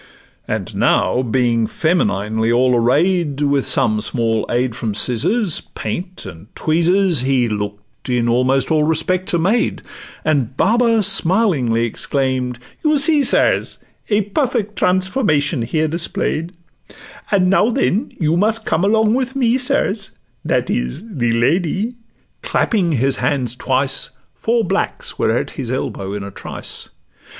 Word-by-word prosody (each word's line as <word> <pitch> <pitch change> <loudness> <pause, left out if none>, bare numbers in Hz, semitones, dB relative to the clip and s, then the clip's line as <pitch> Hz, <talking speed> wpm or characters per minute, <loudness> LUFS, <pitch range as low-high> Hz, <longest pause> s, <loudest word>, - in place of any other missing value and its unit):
And - - -4
now 125 - +2
being 120 -2 +1
femininely 110 - 0
all 125 +1 +3
array'd, 145 +5 +1
With 140 -2 +1
some 115 -6 +2
small 115 -1 -1
aid 120 -1 0
from 110 -4 -3
scissors, 170 - 0
paint, 175 - -5
and 85 +1 -10
tweezers, 170 +1 +2
He 130 -1 +1
look'd 105 +1 -6
in 120 -1 +1
almost 130 +5 +1
all 155 -1 +3
respects 175 +4 0
a - - +3
maid, 200 +8 0 0.4
And 140 -5 0
Baba 230 0 +3
smilingly 170 - +2
exclaim'd, 130 0 -2 0.3
'You 305 -1 +3
see, 300 +1 +4
sirs, 270 - +2 0.3
A 210 0 +3
perfect 210 0 -1
transformation 180 - +1
here 155 +7 0
display'd; 165 +1 -2 0.8
And 185 -2 +3
now, 205 +3 +4
then, 245 -1 0
you 160 -1 +1
must 220 +3 +1
come 160 +3 0
along 220 +2 +3
with 260 +1 -1
me, 245 -3 +2
sirs, 210 -5 0 0.3
That - - 0
is—the 120 - -2
Lady:' 175 - 0 0.5
clapping 205 - 0
his 135 +1 +1
hands 125 -2 -1
twice, 130 +2 0 0.2
Four 230 0 0
blacks - - -2
were - - +2
at - - -3
his - - -5
elbow 95 0 -3
in 100 -1 -4
a 100 - -7
trice. - - -7
155 Hz, 135 wpm, -18 LUFS, 120-200 Hz, 0.8 s, see